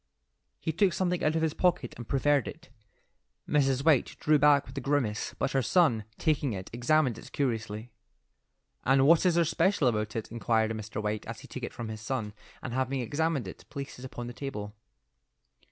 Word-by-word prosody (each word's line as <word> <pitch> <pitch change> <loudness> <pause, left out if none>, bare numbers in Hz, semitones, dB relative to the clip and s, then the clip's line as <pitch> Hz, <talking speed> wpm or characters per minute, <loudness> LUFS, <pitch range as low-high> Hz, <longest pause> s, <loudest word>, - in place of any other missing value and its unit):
He 160 - -2
took 180 +3 +2
something 180 -2 0
out 155 +1 +2
of 160 - +1
his 160 -2 +1
pocket 175 -10 +1
and 120 -1 -9
proffered 140 0 +2
it. 165 +4 -9 0.8
Mrs. 135 -2 +2
White 150 -6 +3
drew 150 -1 +3
back 145 -1 +5
with 130 - -12
a 140 - -3
grimace, 125 -6 -1
but - - -1
her 135 - +2
son, 120 - +3
taking 145 -6 +1
it, 95 -1 -7
examined 125 0 +2
it - - -12
curiously. 110 -3 -2 0.9
"And 135 +1 +4
what 165 +4 +6
is 175 - +3
there 170 -1 +4
special 165 -2 +2
about 110 -2 0
it?" 110 -2 -4
inquired 110 -1 +1
Mr. 110 0 -5
White 105 0 -2
as - - -6
he - - -12
took - - -7
it - - -4
from 115 -2 -6
his 110 -1 -6
son, 110 -3 -3 0.3
and 125 - -4
having 130 +1 0
examined 145 0 -1
it, 95 - -9
placed 140 -3 -7
it 130 - -8
upon 120 -2 -6
the 120 - -6
table. 115 -7 -6
130 Hz, 195 wpm, -29 LUFS, 115-150 Hz, 0.9 s, what